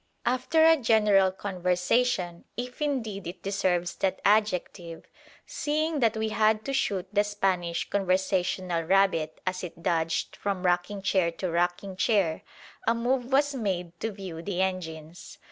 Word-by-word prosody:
After 260 +6 +3
a 325 0 +7
general 210 -6 +4
conversation, 180 0 0
if 250 +3 -6
indeed 225 - -2
it 175 0 -8
deserves 180 -3 0
that 190 -1 0
adjective, 185 -5 0 0.4
seeing 310 +1 -1
that 225 -3 +2
we 220 0 -1
had 215 0 +2
to 275 - -2
shoot 195 -8 0
the 205 0 +4
Spanish 190 -5 -1
conversational 185 -2 0
rabbit 165 -3 +2
as 185 0 -2
it 170 -1 -8
dodged 165 -2 0
from 195 -2 -3
rocking 180 +3 0
chair 185 -4 +2
to 180 0 -3
rocking 175 +3 -1
chair, 190 -5 +1 0.5
a 230 - +4
move 245 +2 0
was 280 +3 +2
made 190 -8 -2
to 225 - -2
view 190 -5 -7
the 180 +1 -4
engines. 170 -3 -4
195 Hz, 145 wpm, -27 LUFS, 175-220 Hz, 0.5 s, a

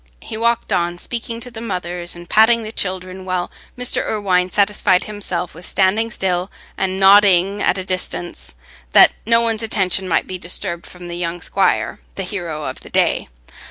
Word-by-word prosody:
He - - -6
walked 235 +1 0
on, 175 0 0
speaking 230 +3 -4
to 250 - -6
the 225 -1 -8
mothers 180 -5 -3
and 175 0 -11
patting 225 +3 +4
the 215 - -6
children, 185 -2 -3
while 185 -1 -2 0.3
Mr. 250 0 +1
Irwine 185 -4 0
satisfied 200 -2 +2
himself 190 -4 -4
with 170 - -12
standing 200 +5 +1
still 185 -3 -1 0.3
and 190 0 -1
nodding 195 0 +5
at - - +2
a 185 - -4
distance, 175 - -5 0.4
that - - +8 0.2
no 230 0 +5
one's 225 -1 0
attention 190 -4 0
might 165 - +1
be 185 -1 -6
disturbed 175 0 -4
from 180 -1 -11
the 175 0 -5
young 175 0 -3
squire, 195 +3 0 0.2
the 195 - -3
hero 175 -5 -5
of 130 - -5
the - - -13
day. - - +1
185 Hz, 175 wpm, -19 LUFS, 175-210 Hz, 0.4 s, that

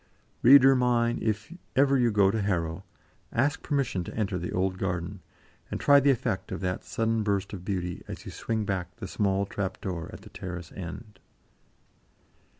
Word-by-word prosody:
Reader 135 +1 +8
mine, 120 -1 +2
if 110 +7 -2 0.2
ever 140 +1 +4
you 125 -3 +3
go 100 -3 +4
to 110 +1 -1
Harrow, 85 -2 -1 0.5
ask 140 +5 +1
permission 135 -11 -1
to - - -7
enter 100 -4 -1
the 90 - -4
old 95 0 0
garden, 90 0 -2 0.5
and - - -3
try 140 0 +6
the 140 +1 +3
effect 115 -6 0
of - - -3
that 90 0 -2
sudden 115 0 0
burst 100 -2 -1
of 90 -3 -6
beauty, 90 -2 -3
as - - -8
you - - -6
swing 110 -2 -2
back 90 -3 -3
the 110 -5 -7
small 100 0 0
trap 95 -1 -4
door 90 -4 -4
at - - -10
the - - -12
terrace 90 -2 -7
end. 95 +3 -8
100 Hz, 175 wpm, -28 LUFS, 95-115 Hz, 0.5 s, Reader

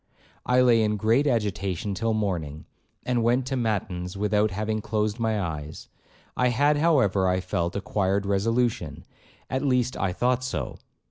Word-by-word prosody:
I 125 0 +4
lay 120 -3 +5
in 105 -1 +1
great 115 +8 +2
agitation 100 - -1
till 115 +3 -1
morning, 85 -8 -3 0.4
and 125 -1 +1
went 120 +3 +2
to 135 +1 -2
matins 100 -6 -2
without 105 +1 +2
having 110 +2 -2
closed 110 0 -1
my 110 -2 0
eyes, 80 -4 -5 0.5
I 125 - +2
had, 145 +5 +2
however, 130 - +3
I 90 0 +2
felt, 85 -1 -2
acquired 100 0 0
resolution,—at 115 +5 -2
least 125 -2 +1
I 95 -1 -1
thought 125 +6 0
so. 130 - -4
110 Hz, 145 wpm, -25 LUFS, 95-125 Hz, 0.5 s, lay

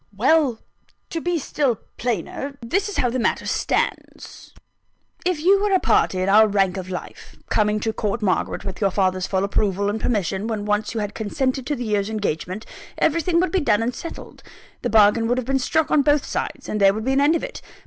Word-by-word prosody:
"Well, 270 +1 +3 0.5
to 330 - -3
be 350 +1 0
still 280 -3 0 0.2
plainer, 245 +5 -3
this 390 - 0
is 410 - -5
how 245 - +1
the 255 - -1
matter 230 - 0
stands: - - -3 0.8
If 365 -4 0
you 390 +4 +4
were 410 -1 +1
a 380 - +5
party 185 - +2
in - - -1
our 215 +2 +6
rank 195 -2 +1
of 185 -1 -6
life, 180 - -8 0.2
coming 210 0 +2
to 220 0 -1
court 215 +1 -2
Margaret 185 -3 -1
with 190 +1 -6
your 200 - +3
father's 185 -1 0
full 190 -1 0
approval 200 0 0
and 220 +1 -4
permission 205 -2 -1
when 215 -3 -3
once 210 +2 -1
you 220 - -1
had 205 0 -4
consented 260 +3 -2
to 295 - 0
the 245 -2 -5
year's 205 -1 0
engagement, 205 -1 -3 0.3
everything 335 +2 +2
would 370 - 0
be 380 - +1
done 225 -6 +2
and 245 +2 -1
settled; 335 - -9 0.4
the - - -1
bargain 220 +1 +4
would 245 +2 +1
have 255 - -2
been 270 +1 +1
struck 315 +4 0
on 295 - +5
both 290 0 +2
sides; - - -4
and 210 - -2
there 195 0 +5
would 220 +1 -4
be 265 - +1
an 275 - +3
end 295 +3 +4
of - - -2
it. - - -6
225 Hz, 215 wpm, -22 LUFS, 205-285 Hz, 0.8 s, our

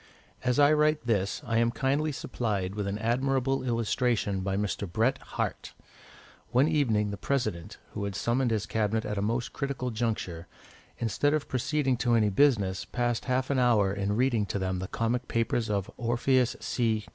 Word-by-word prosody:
As 125 -1 +1
I 145 +1 +6
write 150 -3 +2
this, 105 +3 0
I 115 -1 +1
am 115 0 +3
kindly 140 +5 0
supplied 105 -8 -2
with 100 -1 -3
an 100 +1 -2
admirable 130 +4 0
illustration 115 -4 0
by 95 +1 -1
Mr. 100 -2 -2
Bret 115 +7 +1
Harte. - - -4 0.7
One 130 +4 +3
evening 115 -10 +1
the 100 - -5
President, 110 -12 -2
who 100 - -4
had 100 -1 -4
summoned 120 +5 +1
his 110 -3 0
Cabinet 110 0 0
at 105 -1 -2
a - - -1
most 115 +3 -1
critical 135 -3 -3
juncture, 105 -7 -3 0.5
instead 145 +6 +1
of 155 - -2
proceeding 135 0 0
to 120 -1 +2
any 110 -2 +3
business, 100 -6 +2
passed 120 -1 -2
half 130 +1 0
an 135 - +2
hour 110 -6 +3
in 100 0 -1
reading 120 -4 +1
to 100 - -2
them 95 -1 -2
the 95 - -4
comic 120 +4 -1
papers 115 0 0
of 100 -1 -1
Orpheus 120 +1 +1
C. 110 -3 0
115 Hz, 175 wpm, -28 LUFS, 105-130 Hz, 0.7 s, I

